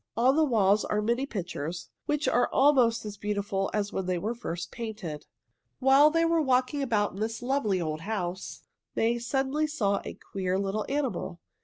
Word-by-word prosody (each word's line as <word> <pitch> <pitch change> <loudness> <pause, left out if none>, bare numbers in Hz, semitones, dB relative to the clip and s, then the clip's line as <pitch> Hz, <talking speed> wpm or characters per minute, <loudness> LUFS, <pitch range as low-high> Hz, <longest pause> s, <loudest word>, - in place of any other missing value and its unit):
On 255 +4 +4
the 320 - +4
walls 215 -7 +3
are 210 - 0
many 235 +6 0
pictures, 175 - -5 0.2
which 300 0 0
are 245 +1 +3
almost 255 -6 +4
as 205 -1 -6
beautiful 200 -1 -1
as 205 -1 -2
when 190 -1 -2
they 180 -1 0
were 210 +7 -2
first 175 -7 -5
painted. 210 -10 -6 0.5
While 270 +3 +6
they 330 +1 +2
were 330 -1 +3
walking 260 +1 +1
about 220 -6 +1
in 195 - -8
this 225 +2 -3
lovely 245 -7 +1
old 155 -2 -3
house, 185 -2 -4 0.3
May 235 +1 +1
suddenly 270 +5 0
saw 200 -10 0
a - - -7 0.2
queer 185 -1 0
little 200 +2 -2
animal. 265 -11 -2
220 Hz, 175 wpm, -28 LUFS, 195-265 Hz, 0.5 s, While